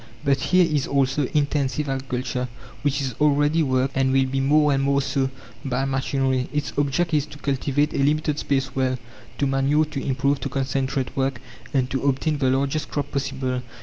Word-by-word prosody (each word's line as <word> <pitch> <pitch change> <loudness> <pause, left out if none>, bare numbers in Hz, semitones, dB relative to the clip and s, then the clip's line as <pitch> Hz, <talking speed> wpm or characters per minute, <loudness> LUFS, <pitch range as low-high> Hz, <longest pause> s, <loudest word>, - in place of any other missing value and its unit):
But 135 -1 +3
here 180 +5 +4
is 150 -4 0
also 135 0 +1
"intensive" 145 0 0
agriculture, 130 -2 -2 0.3
which 140 -1 0
is 130 -2 -2
already 150 +2 +3
worked, 130 -2 +1
and 135 0 +2
will 135 0 +3
be 135 +1 -1
more 150 +2 +4
and 135 - +1
more 140 0 +2
so, 135 -1 0 0.3
by 135 0 -1
machinery. 135 -1 0
Its 150 -1 -2
object 145 +4 0
is 150 -1 +2
to 145 - -11
cultivate 145 +1 0
a - - -1
limited 150 +1 +1
space 135 -2 -1
well, 130 -1 +1 0.4
to 140 - +1
manure, 135 +3 +2
to 150 -2 -5
improve, 140 +1 +1
to - - -3
concentrate 135 -1 -1
work, 135 -2 0 0.3
and 130 -2 0
to 135 - -1
obtain 140 +2 0
the 130 -2 +2
largest 140 +3 0
crop 145 - -3
possible. 130 -2 -2
135 Hz, 180 wpm, -23 LUFS, 130-145 Hz, 0.4 s, here